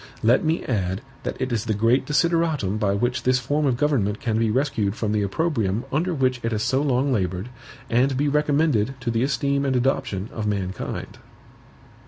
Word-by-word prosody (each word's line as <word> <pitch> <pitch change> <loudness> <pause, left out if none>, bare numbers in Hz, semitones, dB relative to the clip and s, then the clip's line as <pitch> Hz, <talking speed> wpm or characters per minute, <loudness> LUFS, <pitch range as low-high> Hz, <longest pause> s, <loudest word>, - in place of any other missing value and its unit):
Let 120 +4 +4
me 160 +1 0
add 95 -4 -1 0.2
that - - -5
it 130 - -2
is 110 -1 -1
the 110 -2 0
great 120 +5 +2
desideratum 150 - +1
by 100 -2 +1
which 120 +4 0
this 125 +1 +3
form 145 +4 0
of 125 -3 +1
government 120 -8 +1
can 110 -2 -1
be 115 -1 +2
rescued 110 -5 0
from 110 -3 -2
the 105 -1 +1
opprobrium 110 - -1
under 165 +6 0
which 130 -5 +1
it 115 - -2
has 110 -1 -1
so 135 +4 +1
long 135 -1 +1
labored, 95 0 -2 0.4
and 125 +3 +2
be 145 +2 +1
recommended 145 -4 +2
to 120 -1 -1
the 115 0 0
esteem 140 +1 0
and 135 -2 0
adoption 120 -6 0
of 110 -2 -3
mankind. 95 -2 -4
125 Hz, 190 wpm, -23 LUFS, 105-140 Hz, 0.4 s, Let